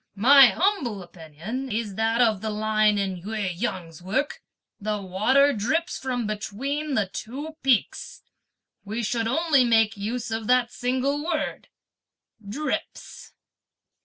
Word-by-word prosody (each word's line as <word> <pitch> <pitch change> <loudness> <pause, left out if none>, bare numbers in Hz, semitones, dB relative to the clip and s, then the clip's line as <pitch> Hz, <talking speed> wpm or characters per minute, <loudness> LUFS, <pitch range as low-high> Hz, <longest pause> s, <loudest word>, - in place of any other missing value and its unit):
My 265 +6 +8
humble 240 - 0
opinion 175 - -7
is 215 -1 -2
that 225 +3 +1
of 220 -5 +3
the 220 - -3
line 215 0 +2
in 190 -3 -2
Ou 220 +3 -5
Yang's 180 -4 -3
work, 260 +11 -2 0.4
'(the 210 0 -2
water) 215 +10 +3
drips 315 - -1
from 250 -3 -2
between 270 +8 -3
the 215 - +2
two 275 +11 -7
peaks,' 260 -5 0 0.6
we 220 +3 -4
should 230 +1 -1
only 300 +1 +3
make 225 -2 +3
use 225 +4 -4
of 225 -1 -3
that 250 -1 +3
single 260 +4 -1
word 315 -2 -3 0.8
'drips.'" 270 +10 -5
225 Hz, 130 wpm, -25 LUFS, 205-265 Hz, 0.8 s, My